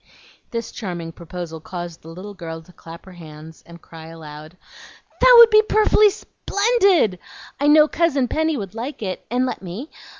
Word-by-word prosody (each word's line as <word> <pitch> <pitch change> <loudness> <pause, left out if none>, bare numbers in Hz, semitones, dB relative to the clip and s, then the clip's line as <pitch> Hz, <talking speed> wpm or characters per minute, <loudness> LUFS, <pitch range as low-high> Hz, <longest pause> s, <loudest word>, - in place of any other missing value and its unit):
This 230 -1 -5
charming 175 -6 -6
proposal 170 -1 -8
caused 175 0 -8
the - - -16
little 185 +5 -9
girl 165 -3 -8
to 180 - -20
clasp 165 0 -13
her 190 - -13
hands 160 -2 -13
and 170 0 -14
cry 160 -1 -12
aloud, 155 0 -12 0.6
"That - - +7
would 470 -1 +9
be 430 0 +7
perfully 430 -1 +3
sp'endid! 400 - 0 0.4
I 285 - +1
know 300 +1 +6
Cousin 295 -6 0
Penny 315 +3 -1
would 195 -4 -7
like 235 +2 -6
it, 185 -2 -5
and 250 +2 0
let 255 - -5
me. 195 - -8
190 Hz, 170 wpm, -21 LUFS, -, 0.6 s, would